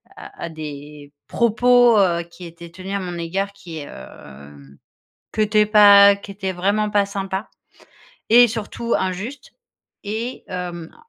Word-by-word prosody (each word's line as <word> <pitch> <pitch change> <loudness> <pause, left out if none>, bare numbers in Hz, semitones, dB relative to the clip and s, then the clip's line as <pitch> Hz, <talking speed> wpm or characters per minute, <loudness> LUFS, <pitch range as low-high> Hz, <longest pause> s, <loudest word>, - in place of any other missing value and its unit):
à - - -10
à - - -6
des 150 -2 -10
propos, 240 0 +3
heu, 170 -3 +1
qui 170 +1 -15
étaient 170 0 -12
tenus 190 +3 -7
à - - -1
mon 175 -2 -6
égard 195 +4 -3
qui, 170 -5 -11
hem, 70 - -13 0.6
qui - - -7
étaient 210 0 +3
pas 200 -1 +7
qui 200 0 -11
étaient 195 -1 -4
vraiment 200 +4 -1
pas 205 -1 +2
sympas 195 0 -5 0.8
et 240 +1 +6
surtout 230 +1 -5
injustes. 190 +9 -5 0.5
Et 225 +5 -5
hem, 175 -3 -7
195 Hz, 140 wpm, -20 LUFS, 170-210 Hz, 0.8 s, pas